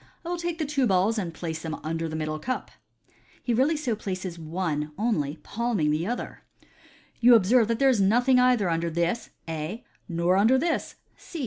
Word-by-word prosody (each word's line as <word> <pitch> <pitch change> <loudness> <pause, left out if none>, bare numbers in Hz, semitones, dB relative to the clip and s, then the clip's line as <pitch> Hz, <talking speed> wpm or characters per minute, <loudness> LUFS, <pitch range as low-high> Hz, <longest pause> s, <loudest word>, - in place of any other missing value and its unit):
I - - -4
will 350 - -1
take 345 -1 -3
the 315 - -1
two 275 -3 +1
balls, 200 +3 +2
and 175 -4 -3
place 160 -1 -5
them 160 -1 -4
under 165 +1 -2
the 155 - -5
middle 155 0 -3
cup." 255 +9 -4 0.7
He 240 - 0
really 275 +7 +2
so 260 -7 -1
places 185 -4 -5
one 155 -2 -3
only, 165 -10 -1
palming 220 -9 0
the 155 +4 -1
other. 245 +2 -4 0.4
" - - -28
You 240 0 +8
observe 225 +2 +4
that 230 0 0
there 275 - +3
is 245 -6 +3
nothing 245 +6 +4
either 250 -6 +3
under 170 0 0
this 170 +7 -1 0.2
(A), 165 +8 -5 0.3
nor 170 +2 +2
under 225 +6 +5
this 325 +4 -1 0.2
(C)." 335 - -9
200 Hz, 195 wpm, -26 LUFS, 165-245 Hz, 0.7 s, You